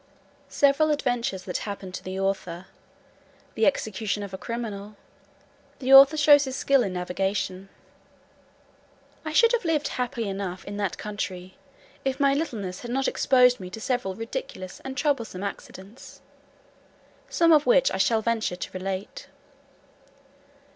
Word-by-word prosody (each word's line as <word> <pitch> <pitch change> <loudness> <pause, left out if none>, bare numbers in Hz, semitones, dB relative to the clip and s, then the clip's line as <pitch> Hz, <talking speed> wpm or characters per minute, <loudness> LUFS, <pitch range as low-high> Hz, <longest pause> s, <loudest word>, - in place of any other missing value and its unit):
Several 285 +2 +3
adventures 245 -9 -1
that 180 -1 -3
happened 200 -3 -6
to - - -6
the 185 +1 -5
author. 190 -2 -2 0.9
The 220 - +2
execution 210 -5 -1
of 200 -1 -8
a - - -4
criminal. 215 -3 -6 0.8
The 265 0 +1
author 275 +3 +9
shows 290 -1 +6
his 265 -1 -5
skill 275 -1 +3
in 195 -5 -2
navigation. 190 +1 -3 1.5
I 315 - -4
should 460 +9 +5
have 480 -3 0
lived 320 -3 0
happy 245 -3 -3
enough 195 -2 -5
in 205 0 -6
that 200 -3 -2
country, 185 -3 -6 0.5
if 270 +1 -2
my 280 -1 +4
littleness 220 - -3
had 240 - -8
not 270 +2 0
exposed 250 -2 +4
me 185 - -7
to 200 - -8
several 220 -5 -2
ridiculous 225 - -6
and 265 0 -6
troublesome 240 -10 -1
accidents; 200 +2 -9 1.1
some 335 -1 +3
of 300 -1 +4
which - - +4
I - - -2
shall 225 -5 +2
venture 225 -5 0
to 180 - -7
relate. 195 - -5
225 Hz, 140 wpm, -25 LUFS, 195-275 Hz, 1.5 s, author